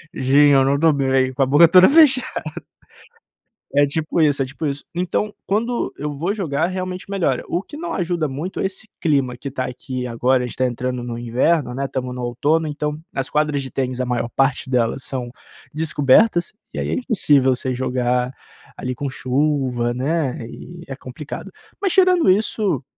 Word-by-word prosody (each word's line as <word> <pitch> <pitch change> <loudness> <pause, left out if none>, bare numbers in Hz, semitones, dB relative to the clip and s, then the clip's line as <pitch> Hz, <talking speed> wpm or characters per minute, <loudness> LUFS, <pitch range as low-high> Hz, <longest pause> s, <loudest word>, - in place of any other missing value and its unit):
"Sim 140 +3 +4
eu 135 -1 +5
não 140 +1 +2
estou 160 +3 +4
bem. 135 -2 +1
com 135 - +1
a - - +3
boca 145 +6 +6
toda 185 +2 +7
fechada. 275 -4 +4 1.3
É 145 - +5
tipo 155 +3 -1
isso, 145 -3 +3
é - - -2
tipo 140 +4 -7
isso, 140 0 -3
então 180 +4 -1
quando 225 - -1
eu 150 0 -3
vou 165 +7 -2
jogar 165 -7 -1
realmente 185 0 -5
melhora. 195 -3 0
O 175 - 0
que 295 - -11
não 340 +2 -4
ajuda 170 -3 -1
muito 150 +8 -5
é - - +1
esse 190 +3 -8
clima 140 -6 +1
que 135 +3 -6
tá 130 -1 -3
aqui 125 0 -5
agora, 125 +2 +1
a - - -2
gente 125 - -7
tá 130 - +2
entrando 125 0 -3
no 120 -1 -5
inverno, 125 +3 +1
né, 140 - -2
estamos 130 -2 -4
no 125 - -5
outono 145 +7 0
então, 150 0 -3 0.2
as 135 0 -3
quadras 150 -1 0
de 135 -1 -7
tênis, 130 -1 -2
a 130 - 0
maior 120 -1 -1
parte 135 -1 +1
delas, 125 +1 0
são 125 -3 -5 0.4
descobertas, 160 +5 +3 0.2
e - - -6
aí - - -2
é - - 0
impossível 145 - +3
você 130 0 -3
jogar, 125 0 0 0.4
ali 125 0 -4
com 145 +1 -4
chuva, 130 -3 0
né, 130 -1 -2
e 170 +7 -11
é 135 - -6
complicado, 130 +2 -8 0.3
mas 390 -3 +1
tirando 365 - +4
isso, 195 - 0
140 Hz, 190 wpm, -21 LUFS, 130-170 Hz, 1.3 s, toda